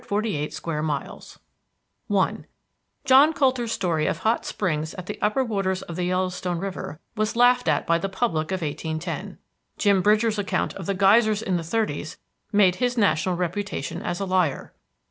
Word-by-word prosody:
AREA, 200 Hz, -8 st, -1 dB
3,348 -, -, -14 dB
SQUARE 155 Hz, -2 st, -3 dB
MILES 150 Hz, -2 st, -5 dB, 0.7 s
I -, -, 0 dB, 0.6 s
John 275 Hz, +4 st, +6 dB
Coulter's 255 Hz, -5 st, +1 dB
story 170 Hz, -7 st, 0 dB
of -, -, 0 dB
hot 220 Hz, +6 st, 0 dB
springs 155 Hz, -5 st, -2 dB
at 185 Hz, -, -7 dB
the 205 Hz, -, -6 dB
upper 215 Hz, +6 st, +2 dB
waters 195 Hz, -5 st, -1 dB
of 170 Hz, -, -8 dB
the 180 Hz, 0 st, -1 dB
Yellowstone 180 Hz, -1 st, -1 dB
River 180 Hz, -4 st, -5 dB, 0.2 s
was 215 Hz, +1 st, -1 dB
laughed 245 Hz, +1 st, +4 dB
at -, -, +2 dB
by 170 Hz, 0 st, +2 dB
the 195 Hz, -, -3 dB
public 190 Hz, -6 st, -1 dB
of 185 Hz, -2 st, -2 dB
1810. 155 Hz, +1 st, -4 dB, 0.4 s
Jim 200 Hz, -3 st, +3 dB
Bridger's 215 Hz, +2 st, +2 dB
account 200 Hz, -, -1 dB
of 190 Hz, -, -8 dB
the 195 Hz, -, 0 dB
geysers 210 Hz, +3 st, +4 dB
in 185 Hz, -4 st, 0 dB
the 170 Hz, -, -4 dB
thirties 165 Hz, -4 st, -2 dB, 0.3 s
made 195 Hz, -3 st, +4 dB
his 245 Hz, 0 st, 0 dB
national 180 Hz, -3 st, +2 dB
reputation 180 Hz, -3 st, -3 dB
as 175 Hz, -, -3 dB
a 200 Hz, -, -1 dB
liar. 185 Hz, -6 st, 0 dB
190 Hz, 170 wpm, -24 LUFS, 170-215 Hz, 0.7 s, John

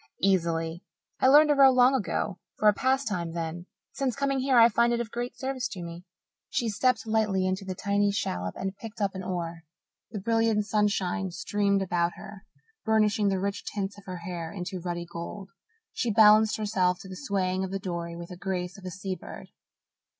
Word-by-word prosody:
"Easily. 170 Hz, -3 st, +1 dB, 0.4 s
I -, -, +4 dB
learned 300 Hz, +3 st, +7 dB
to -, -, +6 dB
row 275 Hz, -1 st, +8 dB
long 255 Hz, 0 st, +5 dB
ago 200 Hz, -6 st, -1 dB, 0.2 s
for 215 Hz, -, +2 dB
a 210 Hz, -, +7 dB
pastime 220 Hz, -10 st, 0 dB
then. 170 Hz, +1 st, -4 dB, 0.2 s
Since 265 Hz, -3 st, -2 dB
coming 275 Hz, -1 st, 0 dB
here 260 Hz, -1 st, +2 dB
I 230 Hz, 0 st, +9 dB
find 235 Hz, +1 st, +2 dB
it 235 Hz, -, +1 dB
of 230 Hz, -2 st, -4 dB
great 240 Hz, +1 st, -4 dB
service 260 Hz, -1 st, -2 dB
to 180 Hz, -3 st, -7 dB
me." 170 Hz, +1 st, -8 dB, 0.4 s
She 235 Hz, -, 0 dB
stepped 255 Hz, +4 st, +1 dB
lightly 215 Hz, -4 st, +1 dB
into 190 Hz, +1 st, -2 dB
the 185 Hz, -1 st, -4 dB
tiny 200 Hz, +1 st, +1 dB
shallop 90 Hz, -, -2 dB
and 195 Hz, +1 st, -3 dB
picked 225 Hz, +2 st, -10 dB
up 200 Hz, -2 st, 0 dB
an 190 Hz, -, -5 dB
oar. 170 Hz, -3 st, -4 dB, 0.5 s
The 215 Hz, -, -5 dB
brilliant 225 Hz, 0 st, +1 dB
sunshine 205 Hz, -2 st, 0 dB
streamed 200 Hz, +2 st, 0 dB
about 175 Hz, -2 st, 0 dB
her, 200 Hz, -1 st, -11 dB, 0.4 s
burnishing 215 Hz, -1 st, +2 dB
the 195 Hz, -1 st, +1 dB
rich 200 Hz, +1 st, -3 dB
tints 200 Hz, -1 st, -4 dB
of 200 Hz, -, -18 dB
her 185 Hz, -1 st, -6 dB
hair 170 Hz, -2 st, -5 dB
into 185 Hz, -1 st, -5 dB
ruddy 175 Hz, 0 st, -4 dB
gold. 175 Hz, +3 st, -7 dB, 0.4 s
She 240 Hz, -, -1 dB
balanced 215 Hz, 0 st, +6 dB
herself 185 Hz, -4 st, +1 dB
to -, -, -10 dB
the 190 Hz, -, -8 dB
swaying 185 Hz, +3 st, -1 dB
of 190 Hz, -, -3 dB
the 195 Hz, -, -2 dB
dory 170 Hz, -3 st, -4 dB
with 170 Hz, 0 st, -8 dB
the 180 Hz, -, -8 dB
grace 180 Hz, 0 st, -4 dB
of 190 Hz, -, -13 dB
a -, -, -3 dB
sea 190 Hz, +1 st, -4 dB
bird. -, -, -10 dB
195 Hz, 195 wpm, -27 LUFS, 180-220 Hz, 0.5 s, I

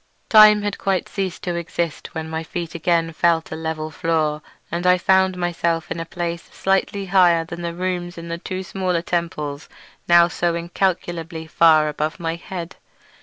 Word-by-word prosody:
Time 215 Hz, -1 st, +8 dB
had 205 Hz, -1 st, -3 dB
quite 190 Hz, -3 st, 0 dB
ceased 190 Hz, -3 st, -4 dB
to 175 Hz, -, -2 dB
exist 170 Hz, -2 st, -4 dB
when 160 Hz, 0 st, -4 dB
my 160 Hz, 0 st, -3 dB
feet 165 Hz, 0 st, -5 dB
again 165 Hz, 0 st, 0 dB
felt 165 Hz, 0 st, +1 dB
a -, -, -3 dB
level 160 Hz, -1 st, -4 dB
floor, 155 Hz, -1 st, 0 dB, 0.3 s
and 175 Hz, +2 st, -1 dB
I 180 Hz, 0 st, +6 dB
found 190 Hz, 0 st, +3 dB
myself 170 Hz, -1 st, -1 dB
in -, -, -3 dB
a 165 Hz, -, -5 dB
place 170 Hz, -1 st, -3 dB
slightly 195 Hz, +1 st, 0 dB
higher 175 Hz, -3 st, +4 dB
than 170 Hz, +1 st, -7 dB
the 170 Hz, 0 st, -4 dB
rooms 180 Hz, -1 st, -3 dB
in 170 Hz, 0 st, -7 dB
the 170 Hz, 0 st, -4 dB
two 185 Hz, +2 st, -5 dB
smaller 180 Hz, -2 st, -2 dB
temples 155 Hz, -5 st, -3 dB, 0.4 s
now 170 Hz, 0 st, +7 dB
so 175 Hz, -1 st, -1 dB
incalculably 170 Hz, -2 st, -2 dB
far 160 Hz, -1 st, +4 dB
above 150 Hz, +1 st, -3 dB
my 165 Hz, -1 st, -2 dB
head. 170 Hz, +1 st, -7 dB
170 Hz, 170 wpm, -21 LUFS, 165-180 Hz, 0.4 s, Time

